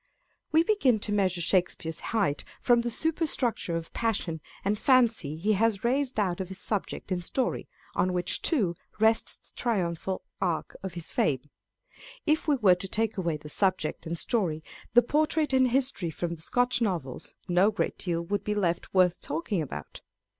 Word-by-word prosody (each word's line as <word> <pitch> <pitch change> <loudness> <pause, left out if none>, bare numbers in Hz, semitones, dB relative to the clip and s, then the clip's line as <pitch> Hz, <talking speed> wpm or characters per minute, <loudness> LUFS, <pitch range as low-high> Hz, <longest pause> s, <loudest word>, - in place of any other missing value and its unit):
We 320 +1 +5
begin 335 - +3
to 210 - -1
measure 185 -3 +1
Shakespeare's 170 -2 0
height 200 -11 0 0.2
from 240 -1 +4
the 240 - -2
superstructure 280 - 0
of 165 -1 -5
passion 195 -8 -1 0.2
and 205 +1 +1
fancy 230 - +3
he 205 +6 +1
has 210 -1 +1
raised 255 0 +1
out 185 -3 0
of 185 - -4
his 190 0 -7
subject 205 -2 -2
and 180 -1 -1
story, 255 +8 -1 0.3
on 185 - +1
which 180 0 0
too 215 - +2 0.3
rests 220 +1 +2
the - - -33
triumphal 185 -5 -1 0.2
arch 170 -4 -1
of 190 -3 -6
his 170 -2 -4
fame: 140 0 0 0.7
if 310 +1 +1
we 295 - +4
were 210 -8 +5
to 180 +2 -3
take 220 +3 -1
away 170 -5 -1
the 150 0 -11
subject 185 -1 0
and 170 +1 -3
story, 165 -8 0 0.3
the 240 - +8
portrait 300 +2 +1
and 260 -1 +5
history 255 -8 +1
from 170 +2 -3
the 165 - -9
Scotch 245 +7 +1
Novels, 170 - -3
no 180 +3 +4
great 215 - -2
deal 170 -2 -1
would 200 +4 -2
be 210 - -1
left 175 -2 -1
worth 180 -2 +4
talking 165 +5 -2
about. 100 - -7
195 Hz, 175 wpm, -28 LUFS, 170-235 Hz, 0.7 s, the